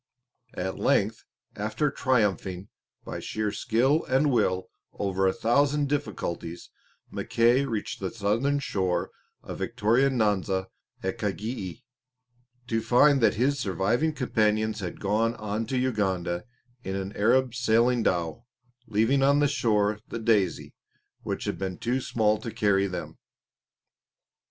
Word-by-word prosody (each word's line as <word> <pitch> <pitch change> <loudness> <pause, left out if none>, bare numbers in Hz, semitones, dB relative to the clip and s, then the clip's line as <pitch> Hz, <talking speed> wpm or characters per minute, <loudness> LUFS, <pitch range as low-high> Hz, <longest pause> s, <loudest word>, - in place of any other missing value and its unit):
At 95 +1 -3
length, 110 +3 +1 0.3
after 110 +8 -1
triumphing 100 -8 0 0.4
by - - -5
sheer 110 -1 -2
skill 125 +9 +1
and 135 +3 +2
will 95 -6 +1 0.2
over 95 -1 0
a - - +4
thousand 140 +7 +2
difficulties, 85 - -4 0.4
Mackay 120 +4 +2
reached 115 -6 -4
the 95 - -2
southern 115 +7 0
shore 95 -9 -1 0.3
of - - -7
Victoria 120 +6 +2
Nyanza 100 -6 0 0.3
at 95 +5 -3
Kagei, 105 0 -4 0.8
to 115 -1 -1
find 135 +4 +4
that 115 - +4
his 140 +5 +1
surviving 115 - +1
companions 110 -5 +1
had 90 -4 -5
gone 110 +4 +1
on 110 0 -3
to 130 - -1
Uganda 95 -8 -1 0.4
in 95 - -3
an 95 +1 -4
Arab 125 +4 +3
sailing 120 0 +2
dhow, 90 +5 -1 0.4
leaving 115 +6 +2
on 140 +1 +4
the 145 0 +4
shore 110 -6 +1
the - - -5
Daisy, 110 -6 +1 0.5
which - - -4
had - - -3
been 95 -2 -3
too 125 +3 -1
small 110 -3 +1
to 115 - -5
carry 100 -3 +2
them. 90 - -6
110 Hz, 130 wpm, -27 LUFS, 100-125 Hz, 0.8 s, a